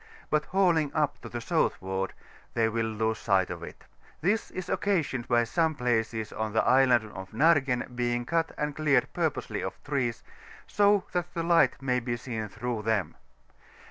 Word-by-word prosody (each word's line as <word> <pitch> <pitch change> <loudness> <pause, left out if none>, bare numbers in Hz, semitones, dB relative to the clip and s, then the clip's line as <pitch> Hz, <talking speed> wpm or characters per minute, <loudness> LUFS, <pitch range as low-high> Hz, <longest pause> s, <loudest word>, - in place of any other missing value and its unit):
but 150 0 +2
hauling 170 -6 +2
up 150 -2 0
to - - -8
the 120 - -5
soutibward, 95 -4 -1 0.5
lAiej 115 -1 +2
will 115 -1 0
lose 110 0 -1
sight 95 -3 +2
of - - -6
it: - - -10 0.4
this 205 +8 0
is 185 - -6
occasioned 160 -11 0
by 120 -1 +3
some 160 +6 +1
places 115 -4 -1
on 110 -1 -3
the 110 - +3
Island 125 -4 +4
of 95 0 -8
Naigen 135 -3 +2
being 120 0 -1
cut 165 +3 0
and 150 -1 -2
cleared 150 -3 +2
purposely - - -2
of - - -4
trees, 125 -5 -2 0.4
so 205 -1 +3
that 175 -1 -2
the 165 - -1
light 170 0 +3
may 125 -1 +1
be 120 0 -3
seen 115 -3 -4
through 120 +1 -3
them. 105 -3 0
125 Hz, 170 wpm, -28 LUFS, 110-160 Hz, 0.5 s, Island